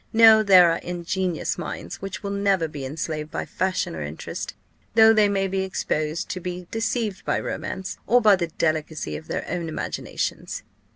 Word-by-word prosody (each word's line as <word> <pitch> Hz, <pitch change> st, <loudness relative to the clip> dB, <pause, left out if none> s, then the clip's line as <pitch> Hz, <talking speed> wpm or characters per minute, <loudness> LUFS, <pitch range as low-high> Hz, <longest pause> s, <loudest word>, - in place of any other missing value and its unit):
No; 220 Hz, -1 st, +8 dB
there 185 Hz, -5 st, +7 dB
are -, -, -1 dB
ingenuous 175 Hz, 0 st, -2 dB
minds 170 Hz, -, -6 dB
which 195 Hz, +1 st, -6 dB
will 200 Hz, -, -3 dB
never 200 Hz, -4 st, +1 dB
be 145 Hz, -3 st, -7 dB
enslaved 155 Hz, +2 st, -4 dB
by -, -, -3 dB
fashion 185 Hz, -, -1 dB
or 80 Hz, -, -5 dB
interest, 75 Hz, +1 st, -6 dB, 0.4 s
though 225 Hz, 0 st, +8 dB
they 210 Hz, -2 st, +4 dB
may 195 Hz, -1 st, +1 dB
be 190 Hz, 0 st, -1 dB
exposed 160 Hz, -4 st, -2 dB
to 185 Hz, -, -3 dB
be 180 Hz, 0 st, -5 dB
deceived 225 Hz, -3 st, -1 dB
by -, -, 0 dB
romance, 190 Hz, 0 st, -5 dB
or 245 Hz, -, +5 dB
by 215 Hz, -4 st, +6 dB
the 175 Hz, -2 st, -2 dB
delicacy 155 Hz, -, -2 dB
of 80 Hz, +1 st, -8 dB
their -, -, -3 dB
own 170 Hz, -1 st, -3 dB
imaginations." 155 Hz, -, -4 dB
185 Hz, 175 wpm, -24 LUFS, 160-200 Hz, 0.4 s, No